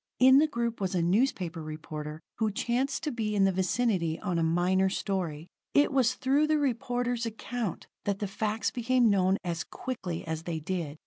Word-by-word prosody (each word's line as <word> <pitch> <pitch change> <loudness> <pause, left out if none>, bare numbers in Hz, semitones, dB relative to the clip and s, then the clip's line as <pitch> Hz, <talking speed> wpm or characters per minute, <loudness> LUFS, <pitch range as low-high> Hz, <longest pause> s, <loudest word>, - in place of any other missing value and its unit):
In 260 +1 +7
the 310 - +4
group 235 -6 -2
was 190 -1 -1
a 175 - +2
newspaper 180 -4 +1
reporter 155 0 -6 0.2
who 220 -1 +2
chanced 250 +7 -1
to 305 - -1
be 220 -4 -2
in 200 - +4
the 195 - +4
vicinity 185 -3 0
on 180 -5 -1
a - - +1
minor 180 +3 +2
story. 175 -6 -2 0.3
It 285 0 +5
was 255 -2 +3
through 275 +4 +2
the 310 0 +3
reporter's 245 -3 -1
account 225 -2 -4 0.2
that 200 -1 0
the 205 - -3
facts 215 +3 -1
became 245 -1 +3
known 190 -1 +3
as 170 -3 -2
quickly 190 -10 -5
as 160 -1 -3
they 165 -1 -3
did. 160 -2 -3
200 Hz, 185 wpm, -29 LUFS, 170-245 Hz, 0.3 s, In